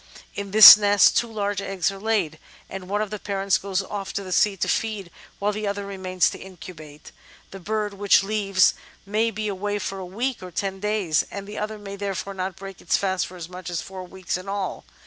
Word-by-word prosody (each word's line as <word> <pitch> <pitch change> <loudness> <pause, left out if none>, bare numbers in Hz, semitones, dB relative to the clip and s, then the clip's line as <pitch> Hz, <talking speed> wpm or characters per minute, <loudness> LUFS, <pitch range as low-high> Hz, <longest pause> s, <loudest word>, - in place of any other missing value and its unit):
In 200 0 -5
this 210 +1 +12
nest 205 -1 +4
two 235 -1 +1
large 205 -2 -2
eggs 195 -2 -1
are 195 - -9
laid, 195 -8 -1 0.3
and 190 -1 -7
one 205 +1 0
of 210 - -7
the 210 - -5
parents 195 -1 0
goes 195 -1 -2
off 195 0 -6
to 200 - -3
the 185 - -8
sea 200 +2 +2
to - - -1
feed 210 -6 -2 0.3
while 205 +1 0
the 210 0 -4
other 200 0 -3
remains 185 -2 0
to - - -9
incubate. 160 -5 -12 0.4
The 195 - -9
bird 210 +2 -2
which 200 0 +3
leaves 195 -2 +2 0.3
may 215 +3 +1
be 215 0 -4
away 205 +1 -2
for 195 -1 -5
a - - -6
week 235 +7 -3
or 185 - -8
ten 190 +2 -3
days, 205 -6 0
and 200 -1 -7
the 210 +1 -7
other 215 +1 -4
may 200 -1 -8
therefore 200 0 -4
not 185 -1 -4
break 195 -1 -10
its - - +1
fast 190 -2 -1
for 180 - -12
as 165 -2 -7
much 180 0 -8
as 175 -2 -2
four 190 -1 -8
weeks 185 0 -4
in 185 +2 -9
all. 195 - -4
195 Hz, 225 wpm, -24 LUFS, 185-205 Hz, 0.4 s, this